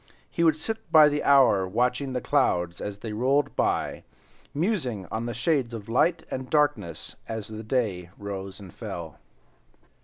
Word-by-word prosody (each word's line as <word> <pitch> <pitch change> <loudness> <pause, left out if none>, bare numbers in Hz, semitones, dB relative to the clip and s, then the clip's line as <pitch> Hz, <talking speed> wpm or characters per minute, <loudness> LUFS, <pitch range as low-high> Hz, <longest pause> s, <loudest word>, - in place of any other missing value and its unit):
He 170 - 0
would 160 -2 +5
sit 220 +8 -5
by 155 -2 +8
the 145 0 -1
hour 125 -9 +5
watching 125 +6 0
the 125 - -1
clouds 90 - +1
as 105 -1 -5
they 105 +1 -6
rolled 135 +6 +1
by, - - 0 0.5
musing 145 - -1
on 115 +2 -2
the 120 - -3
shades 120 -1 0
of 105 -3 -8
light 165 +8 +2
and 130 0 -4
darkness 145 - 0
as 110 -2 -5
the 110 0 -6
day 105 -7 -1
rose 100 -1 -6
and 95 -4 -11
fell. 80 -4 -7
120 Hz, 160 wpm, -26 LUFS, 100-145 Hz, 0.5 s, by